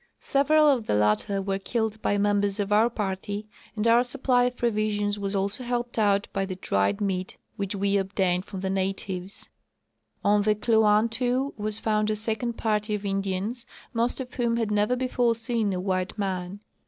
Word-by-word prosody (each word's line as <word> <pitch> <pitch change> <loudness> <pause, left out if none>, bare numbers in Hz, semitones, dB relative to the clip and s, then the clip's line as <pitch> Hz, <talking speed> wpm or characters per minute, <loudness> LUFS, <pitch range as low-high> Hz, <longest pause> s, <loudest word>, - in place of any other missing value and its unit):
Several 300 +2 +3
of 255 -7 +2
the - - +2
latter 105 - +2
Avere 195 0 -2
killed 220 0 -2
by 205 - +1
members 205 0 +1
of 205 0 0
our 220 +3 +5
party, 205 -1 -3 0.3
and 215 +1 0
our 230 +1 +6
supply 245 0 +2
of 250 0 -2
provisions 210 -3 0
was 200 0 -2
also 200 +5 -1
helped 240 -1 -2
out 200 -2 +2
by 195 - 0
the 190 -1 -4
dried 100 - 0
meat 185 -2 -2 0.2
which 200 0 -3
we 200 0 +1
obtained 190 -1 0
from 195 -3 -7
the 190 - -2
natives. 190 0 -3 0.7
On 205 0 +4
the 210 +1 +2
Kluantu 230 +5 +2
was 215 0 -3
found 215 -1 0
a 215 - +1
second 225 +3 -2
party 215 -1 -1
of 205 0 -6
Indians, 195 +4 -2 0.3
most 235 +3 0
of 255 -2 -6
whom 235 -2 0
had 225 -2 -1
never 210 +4 +2
before 245 -2 +1
seen 225 -2 -1
a 185 - -2
white 185 +2 -2
man. 190 -1 -3
210 Hz, 180 wpm, -26 LUFS, 195-230 Hz, 0.7 s, our